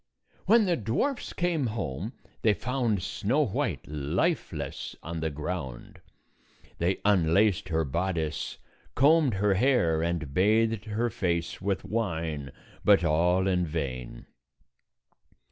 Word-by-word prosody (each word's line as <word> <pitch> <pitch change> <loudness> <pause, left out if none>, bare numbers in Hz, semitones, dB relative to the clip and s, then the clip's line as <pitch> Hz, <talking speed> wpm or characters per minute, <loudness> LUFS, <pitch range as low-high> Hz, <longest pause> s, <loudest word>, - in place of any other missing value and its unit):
When 225 -1 +6
the 180 -2 +2
dwarfs 125 - -1
came 170 -7 0
home, 105 - -4 0.3
they 105 -2 +3
found 120 -3 -1
Snow 115 +9 +1
White 100 - -2
lifeless 75 - -2
on 85 0 -4
the 80 0 -1
ground. 75 -4 -6 0.8
They 90 +3 0
un 90 -6 +3
laced 100 -3 +3
her 80 -1 +1
bodice, 80 +1 -2 0.4
combed 145 -3 +4
her 100 +1 +2
hair, 95 -8 +2
and 85 -4 -2
bathed 110 +4 +2
her 115 +2 -1
face 85 -7 -2
with 100 -1 -1
wine, 80 - -2 0.3
but 100 -3 +5
all 90 +3 +2
in 90 -2 +2
vain. 65 -6 -4
95 Hz, 120 wpm, -28 LUFS, 80-115 Hz, 0.8 s, When